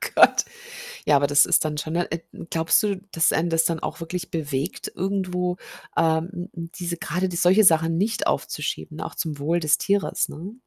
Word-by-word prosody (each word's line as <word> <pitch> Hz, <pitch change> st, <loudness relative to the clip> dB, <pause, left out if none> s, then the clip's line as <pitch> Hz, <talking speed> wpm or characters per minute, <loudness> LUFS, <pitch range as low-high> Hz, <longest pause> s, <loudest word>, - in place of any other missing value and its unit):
Gott. -, -, +6 dB, 0.6 s
Ja, -, -, +5 dB
aber 140 Hz, +1 st, +3 dB
das 145 Hz, 0 st, +5 dB
ist -, -, +3 dB
dann 150 Hz, -1 st, -2 dB
schon, 155 Hz, +2 st, -4 dB
äh, 170 Hz, -1 st, -1 dB
n -, -, -10 dB
glaubst 165 Hz, +7 st, +3 dB
du, 205 Hz, -2 st, 0 dB, 0.2 s
dass 165 Hz, -, +3 dB
einen 170 Hz, +2 st, 0 dB
das 165 Hz, 0 st, +3 dB
dann 165 Hz, -1 st, 0 dB
auch -, -, -5 dB
wirklich 180 Hz, +2 st, -5 dB
bewegt, 145 Hz, 0 st, -3 dB
irgendwo, 180 Hz, -2 st, -1 dB, 0.4 s
ähm, 165 Hz, +1 st, +2 dB
n 175 Hz, +1 st, -6 dB
n 165 Hz, 0 st, -6 dB
diese 175 Hz, -1 st, -3 dB
grade 180 Hz, +3 st, -2 dB
die 175 Hz, -, -5 dB
solche 190 Hz, +5 st, +5 dB
Sachen 165 Hz, -1 st, +4 dB
nicht 220 Hz, +4 st, 0 dB
aufzuschieben, -, -, -3 dB
auch -, -, -5 dB
zum 155 Hz, -3 st, -3 dB
Wohl 165 Hz, +4 st, 0 dB
des 155 Hz, -1 st, +3 dB
Tieres, 200 Hz, 0 st, 0 dB
ne? 180 Hz, +8 st, -8 dB
170 Hz, 195 wpm, -24 LUFS, 160-180 Hz, 0.6 s, Gott